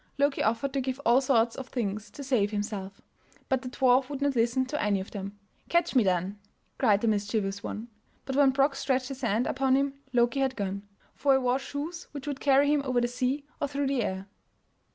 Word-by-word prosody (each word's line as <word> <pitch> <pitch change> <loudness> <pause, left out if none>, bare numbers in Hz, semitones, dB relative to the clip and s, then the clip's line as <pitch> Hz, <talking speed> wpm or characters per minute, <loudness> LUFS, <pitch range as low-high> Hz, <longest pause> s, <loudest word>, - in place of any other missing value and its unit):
Loki 280 0 +2
offered 230 +5 0
to 275 - 0
give 260 +1 -3
all 240 +3 +5
sorts 235 -4 +2
of 265 - -7
things 210 -4 -3
to 280 +7 -9
save 245 -7 +2
himself, 205 -2 -4 0.5
but 265 -1 +1
the 255 - -6
dwarf 255 0 +3
would 285 -2 -4
not 280 -1 +1
listen 240 +3 +2
to 295 +3 -3
any 205 -2 +1
of 190 - -7
them. 200 0 -6 0.3
"Catch 345 0 +2
me, 250 - +6
then!" 185 +2 0 0.4
cried 210 -6 +4
the 230 - +1
mischievous 205 -1 0
one; 220 +3 -5 0.4
but 265 - -3
when 280 -1 +6
Brok 275 +1 +2
stretched 260 -1 0
his 270 0 -7
hand 235 0 +1
upon 265 0 +2
him 275 0 +1 0.2
Loki 240 +2 +2
had 265 -1 +1
gone, 200 -1 -3 0.3
for 280 -1 +2
he - - +5
wore 255 0 +1
shoes 290 +5 -6
which 285 -2 -7
would 285 -2 -4
carry 285 +1 +4
him 295 - +2
over 255 -3 +1
the 240 - +1
sea 255 +4 -2 0.2
or 285 - +1
through 280 0 -2
the 270 -2 +1
air. 190 -2 -3
255 Hz, 215 wpm, -28 LUFS, 215-275 Hz, 0.5 s, me